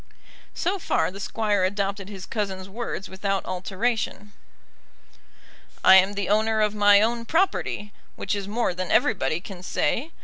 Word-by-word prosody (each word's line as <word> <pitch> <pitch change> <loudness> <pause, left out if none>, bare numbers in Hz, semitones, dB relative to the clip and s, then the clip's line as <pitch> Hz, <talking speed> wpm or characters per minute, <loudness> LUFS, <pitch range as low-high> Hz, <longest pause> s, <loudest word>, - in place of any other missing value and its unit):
So 380 +3 -1
far 330 - 0
the 195 - -9
Squire 205 -1 0
adopted 195 +1 -2
his 195 -3 -8
cousin's 190 -3 -4
words 205 -1 -5
without 195 +1 -2
alteration. 205 +2 -2 1.5
I 190 - +9
am 190 +2 +4
the 200 -1 -3
owner 220 +2 +2
of 210 -1 +2
my 205 -1 +6
own 235 +1 0
property, 230 - -1 0.2
which 200 - -3
is 200 -1 -3
more 220 -1 0
than 185 0 -4
everybody 205 - +2
can 185 -1 -10
say. 230 - -1
205 Hz, 145 wpm, -25 LUFS, 190-220 Hz, 1.5 s, I